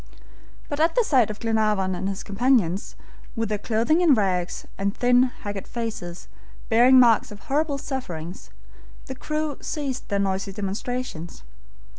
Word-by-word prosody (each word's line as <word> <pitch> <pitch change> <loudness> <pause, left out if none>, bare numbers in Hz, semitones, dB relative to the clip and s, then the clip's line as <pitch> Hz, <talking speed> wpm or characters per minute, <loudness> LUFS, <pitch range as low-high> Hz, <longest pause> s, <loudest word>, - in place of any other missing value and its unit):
But 290 - -4
at 325 +1 +3
the - - +4
sight 255 - +3
of 210 - -6
Glenarvan 215 -4 +1
and 190 +2 -2
his 195 0 -5
companions, 205 -4 +1 0.4
with 225 -2 -1
their 210 -1 -1
clothing 235 - +1
in 320 -6 +6
rags, 185 -4 -1
and 200 +1 -2
thin, 245 +1 +4 0.2
haggard 205 -1 -5
faces, 215 -7 -5 0.4
bearing 245 +3 +6
marks 235 -3 +5
of 205 - -10
horrible 290 +1 0
sufferings, 180 - -6 0.6
the 265 - -6
crew 305 +2 -3
ceased 280 -5 -4
their 200 - +1
noisy 195 0 -1
demonstrations. 200 - -4
225 Hz, 145 wpm, -24 LUFS, 195-260 Hz, 0.6 s, in